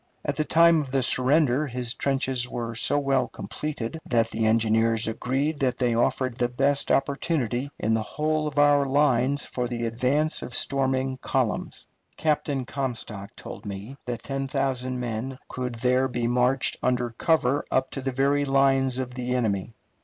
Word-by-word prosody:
At - - -1
the 155 - +1
time 165 0 +5
of 140 - -7
the 135 0 +1
surrender 140 +2 +3
his 125 -2 -2
trenches 130 -2 -1
were 115 -1 -4
so 125 +5 +2
well 135 -2 +1
completed 150 -1 -5
that 115 -2 +1
the 110 0 0
engineers 115 0 +2
agreed 135 +6 -1
that 130 -2 0
they 125 -2 +1
offered 125 +1 0
the 120 - +1
best 140 +3 +1
opportunity 140 -2 0
in 110 - 0
the 110 - +1
whole 155 +6 -1
of 145 -1 -6
our 145 -1 +5
lines 140 -1 +2
for 125 -1 -3
the 120 -1 -3
advance 130 +7 0
of 125 - -4
storming 130 -1 0
columns. - - -2 0.3
Captain 150 -4 0
Comstock 115 -6 -5
told - - -9
me 100 +5 -7
that 120 -2 -4
ten 135 0 -3
thousand 130 -2 -1
men 125 +2 -4
could 125 -1 -4
there 125 +2 +2
be 120 -2 -2
marched 125 +2 +2
under 125 -1 0
cover 145 +1 +1
up 130 0 0
to 135 - -4
the 135 0 -2
very 140 +2 +2
lines 135 -2 +2
of 130 -1 -4
the 125 0 -2
enemy. 105 -4 -1
130 Hz, 170 wpm, -25 LUFS, 120-140 Hz, 0.3 s, time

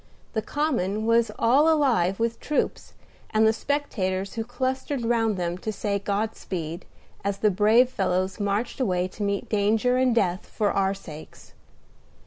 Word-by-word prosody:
The 220 - 0
Common 220 - -1
was 230 0 +3
all 280 +7 +4
alive 235 - +2
with 230 0 -1
troops 300 - -2 0.4
and 220 0 +3
the 220 - +4
spectators 200 -9 -2
who 225 - -2
clustered 260 +2 -2
round 225 -3 +1
them 175 0 -2
to 215 - -3
say 200 -1 -2
God 205 +2 -2
speed, 170 -1 -5 0.4
as 200 0 -1
the 210 +1 +2
brave 215 +6 +4
fellows 185 -1 -1
marched 205 +5 -1
away 185 -7 +1
to 210 - -11
meet 200 -1 -1
danger 220 +4 +2
and 255 -2 +2
death 185 -5 0
for 210 -2 0
our 195 0 +1
sakes. 155 -5 -12
215 Hz, 155 wpm, -25 LUFS, 195-240 Hz, 0.4 s, all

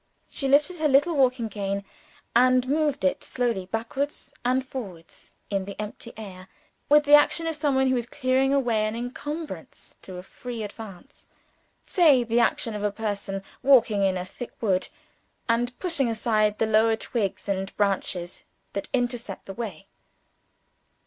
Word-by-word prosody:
She 275 - -3
lifted 295 +6 +3
her 310 -1 +2
little 290 +4 +4
walking 255 -4 +2
cane, 200 -1 -3 0.5
and 255 +1 +5
moved 295 0 +1
it 280 - +1
slowly 235 -7 -1
backwards 235 +8 -4
and 255 +2 +1
forwards 195 -11 -9 0.2
in 195 -1 0
the 200 +1 -8
empty 215 +2 -6
air, 190 -4 -9 0.4
with 295 +1 +6
the 290 0 +2
action 295 +3 +6
of 325 -1 -1
some 290 -2 0
one 265 0 +3
who 260 - +2
is 240 -1 -3
clearing 260 0 +1
away 235 -6 +2
an 215 - -3
encumbrance 290 +7 -6
to 185 -1 -9
a 180 - -7
free 235 +3 -7
advance 210 +4 -10 0.6
say 300 -9 +5
the 230 0 +1
action 235 -1 +1
of 210 -1 -4
a 210 - +1
person 200 -2 -3 0.2
walking 235 -7 +5
in 190 -1 +2
a 180 - -4
thick 235 +6 -8
wood, 190 -5 +1 0.6
and 240 +1 0
pushing 330 -9 0
aside 215 -2 +1
the - - +2
lower 220 +1 +4
twigs 220 -4 -3
and 195 -1 -3
branches 190 -3 -1 0.3
that 200 - -4
intercept 240 -5 -3
the 195 - -7
way. 195 -5 -6
235 Hz, 160 wpm, -26 LUFS, 200-270 Hz, 0.6 s, with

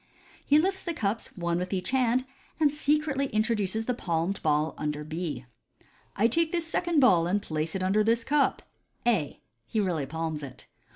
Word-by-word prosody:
He 290 - +4
lifts 380 +4 +1
the 340 -2 -3
cups 215 -1 -1
one 170 -1 0
with 180 0 -4
each 190 +3 -2
hand, 255 -1 +2 0.3
and 295 -2 +3
secretly 295 -2 +1
introduces 215 -2 0
the 250 - 0
palmed 175 -3 -2
ball 155 0 +1
under 150 0 -3
B. 155 - -4 0.4
" - - -31 0.3
I 215 +4 +4
take 325 +7 +1
this 340 -2 0
second 335 0 +1
ball, 180 -11 +5
and 195 +4 +1
place 155 -3 -3
it 190 - -1
under 200 +3 +3
this 230 +2 +2
cup 290 +1 +1 0.2
" - - -46
(A). 185 -12 +1 0.3
He 220 - -1
really 170 -8 0
palms 160 0 -3
it. 135 -3 -9
210 Hz, 185 wpm, -28 LUFS, 165-270 Hz, 0.4 s, ball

